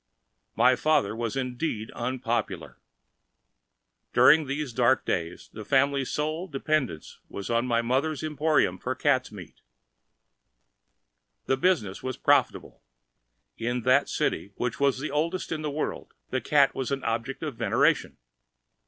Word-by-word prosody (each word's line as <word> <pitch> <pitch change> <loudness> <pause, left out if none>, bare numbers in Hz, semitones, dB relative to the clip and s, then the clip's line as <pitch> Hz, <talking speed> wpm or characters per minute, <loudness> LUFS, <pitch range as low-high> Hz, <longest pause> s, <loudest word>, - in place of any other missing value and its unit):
My 125 +1 +5
father 125 -8 +1
was 115 -1 -3
indeed 125 -3 -3
unpopular. 115 - -3 1.3
During 155 -2 +6
these 140 -2 -3
dark 120 +2 +2
days 85 0 -3
the 110 - -7
family's 135 +2 +2
sole 155 +4 -2
dependence 140 - -2
was 100 +2 -6
on 115 +2 +1
my 115 -1 +1
mother's 135 +5 0
emporium 150 - +1
for 130 +5 -3
cats' 130 -1 +1
meat. 95 -5 -12 1.8
The 135 - +2
business 130 - 0
was 130 -1 -4
profitable. - - +1 0.8
In 120 +2 -1
that 130 +2 +3
city, 100 - -2
which 120 -1 -3
was 140 -2 +2
the 150 - -4
oldest 165 +5 -1
in 155 -1 -2
the 150 - -2
world, 150 +2 -4 0.2
the 130 - -1
cat 140 +3 +3
was 130 - -3
an 135 -1 -2
object 115 +6 -3
of 150 -5 -4
veneration. - - +1
130 Hz, 135 wpm, -27 LUFS, 115-150 Hz, 1.8 s, During